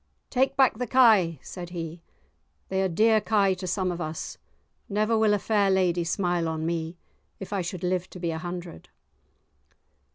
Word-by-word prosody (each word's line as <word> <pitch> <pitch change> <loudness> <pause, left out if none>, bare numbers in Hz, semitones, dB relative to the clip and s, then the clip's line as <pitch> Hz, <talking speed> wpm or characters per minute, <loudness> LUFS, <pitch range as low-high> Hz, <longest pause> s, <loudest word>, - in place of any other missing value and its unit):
"Take 265 +1 +1
back 260 -4 +4
the 250 - -2
kye!" 215 -10 +5
said 175 -2 -8
he; 165 -1 -6 0.7
"they 190 0 0
are 190 - +2
dear 215 +5 +3
kye 205 -3 +2
to 185 0 -6
some 185 0 0
of 175 0 -5
us; 155 -1 -5 0.5
never 215 +2 +1
will 220 -1 +3
a - - +1
fair 205 -1 +1
lady 180 -2 +2
smile 175 -1 0
on 160 0 -3
me 165 0 -3 0.4
if 195 +1 -7
I 195 - 0
should 180 0 -5
live 180 0 -1
to 185 - -10
be 170 -1 -1
a 160 - -4
hundred." 175 - -7
185 Hz, 175 wpm, -26 LUFS, 170-210 Hz, 0.7 s, kye